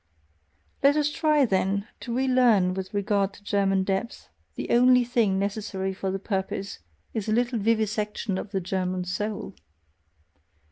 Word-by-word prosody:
Let 280 +1 +5
us 295 -1 +1
try, 305 -3 +3
then, 200 0 0
to 240 - -6
relearn 250 -8 +3
with 190 0 -5
regard 200 -1 0
to 205 - -16
German 195 -2 +1
depth; 195 - -3 0.3
the - - -4
only 250 +1 +5
thing 235 -5 +1
necessary 195 -1 -2
for 190 0 -3
the 190 - -1
purpose 195 0 -3 0.3
is 220 -1 -3
a - - +1
little 240 +1 +1
vivisection 210 -2 0
of - - -6
the 195 -2 -2
German 185 0 -2
soul. 200 +2 -4
205 Hz, 145 wpm, -26 LUFS, 190-235 Hz, 0.3 s, Let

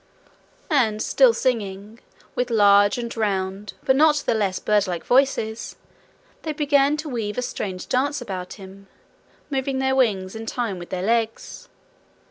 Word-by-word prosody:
And 225 -8 +2
still - - +4
singing, 215 - -3 0.3
with 250 0 -1
large 205 0 +5
and 235 -1 -5
round 195 -2 -2
but 265 - +3
not 300 +2 +5
the - - +2
less 200 -4 0
birdlike 195 -5 0
voices, 245 -4 +1 0.7
they 310 - -3
began 290 -1 +2
to 305 +1 -5
weave 220 -5 -3
a 250 - -1
strange 190 -6 -5
dance 285 +4 0
about 180 -2 -6
him, 195 0 -13 0.6
moving 270 0 -1
their 265 0 +1
wings 200 -7 +1
in 225 0 -7
time 225 -7 -3
with 175 - -9
their 185 -1 -3
legs. 225 +1 -2
225 Hz, 145 wpm, -23 LUFS, 200-265 Hz, 0.7 s, large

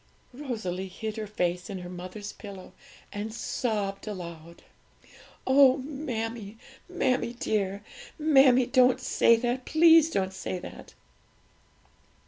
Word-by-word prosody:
Rosalie 215 -9 -4
hid 215 +4 -6
her 215 -1 -4
face 180 -2 -2
in 195 - -5
her 180 -1 -8
mother's 185 +4 -7
pillow 195 -3 -11 0.4
and 210 +2 -4
sobbed 215 -3 -3
aloud. 170 -4 -8 0.8
'Oh, 265 0 +6
mammie, 235 -7 -5 0.3
mammie 255 -9 0
dear! 205 -4 -2 0.3
mammie, 270 -5 +5
don't 255 0 +4
say 235 - +4
that! 245 +2 -2
please 325 0 +6
don't 190 -10 -1
say 190 -1 -4
that!' - - -11
220 Hz, 110 wpm, -27 LUFS, 190-260 Hz, 0.8 s, Oh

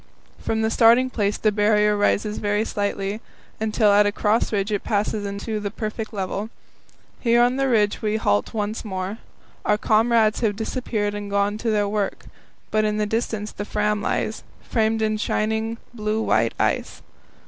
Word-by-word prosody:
From 220 0 -1
the 220 - +1
starting 240 +3 +5
place 205 -3 0
the 215 - +2
Barrier 210 0 +3
rises 210 +1 +1
very 210 +1 0
slightly, 205 0 -2 0.4
until 215 -1 +2
at 205 0 +5
a - - +1
cross 210 +2 +1
ridge 200 0 -1
it 205 - -1
passes 205 -1 -1
into 205 +2 -4
the 205 -1 -3
perfect 215 +1 -5
level. 200 +1 -3 0.7
Here 235 -1 +3
on 245 +2 +3
the 270 0 +1
ridge 210 -4 +2
we 215 0 0
halt 100 - +1
once 215 0 -3
more. 190 +1 -4 0.4
Our 210 - +2
comrades 220 0 +3
have 215 -3 0
disappeared 220 -2 -2
and 205 0 -5
gone 200 +1 0
to 230 - -1
their 210 -2 +2
work, 205 -1 -2 0.5
but 215 0 +2
in 210 0 0
the 210 - +1
distance 220 -1 -2
the 205 - -5
Fram 210 0 0
lies, - - -1 0.2
framed 220 -1 0
in 215 0 +1
shining, 220 +1 -1 0.2
blue 215 -1 -1
white 115 - +1
ice. - - -1
210 Hz, 170 wpm, -23 LUFS, 205-220 Hz, 0.7 s, starting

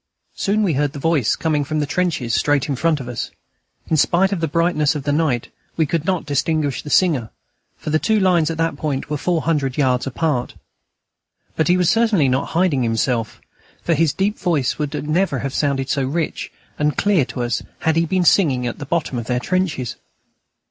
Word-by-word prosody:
Soon 210 +2 +1
we 180 -6 +1
heard 145 0 0
the - - -7
voice 145 -5 +1
coming 155 -3 0
from 155 +2 -2
the 150 - 0
trenches 145 -7 -1
straight 140 +6 +2
in 140 - -1
front 160 +3 +1
of 130 - -7
us. 125 -2 -4 0.6
In 160 - +1
spite 180 +6 +3
of 195 - -1
the 165 - 0
brightness 160 -2 +1
of 145 - -4
the 145 - 0
night, 145 -6 0 0.3
we 160 - +3
could 160 +1 -2
not 185 -3 0
distinguish 145 -1 0
the 150 - -9
singer, 150 - +2 0.5
for 155 - -5
the 155 - +3
two 220 +3 +2
lines 175 -5 +3
at 165 - -3
that 165 -3 -1
point 145 -2 -3
were 150 - 0
four 170 +1 0
hundred 145 -6 0
yards 130 -3 +1
apart. 135 -2 -1 1.0
But 160 - +1
he 180 +1 +4
was 180 -2 +3
certainly 225 - +3
not 130 +2 0
hiding 170 -7 +2
himself, 115 0 -1 0.4
for 170 - +1
his 160 -1 +2
deep 200 +7 -1
voice 160 -9 0
would 150 0 -3
never 165 -2 +1
have 135 - -3
sounded 140 -2 0
so 140 - 0
rich 155 +5 -3 0.3
and 150 0 +1
clear 200 -7 +3
to 125 - -4
us 120 -1 -1 0.2
had 160 -1 +1
he 165 0 +2
been 185 +2 +1
singing 140 -9 +3
at 120 - -4
the 145 - -7
bottom 150 -6 -1
of 115 - -7
their 125 -1 0
trenches. 165 -5 -2
150 Hz, 205 wpm, -20 LUFS, 135-170 Hz, 1.0 s, he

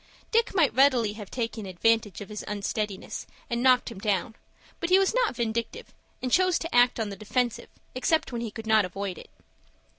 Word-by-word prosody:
Dick 460 -2 +2
might 325 -7 +3
readily 255 -6 +4
have 210 -2 -9
taken 230 -4 -4
advantage 210 +1 +1
of 205 - -8
his 210 -1 -6
unsteadiness, 210 -1 -4 0.2
and 235 0 0
knocked 255 -1 +4
him 195 - -9
down; 205 +2 -1 0.5
but 340 - -2
he 370 - +7
was 390 0 +2
not - - +1
vindictive, 235 - -3 0.3
and 255 - -2
chose 365 +3 +4
to 330 - -5
act 245 0 +5
on 220 -2 -1
the 200 - -6
defensive, 235 +4 -2 0.2
except 315 +5 +1
when 235 -1 -3
he 235 - -3
could 225 +1 -9
not 220 -1 +4
avoid 190 0 -4
it. - - -13
230 Hz, 190 wpm, -27 LUFS, 210-260 Hz, 0.5 s, he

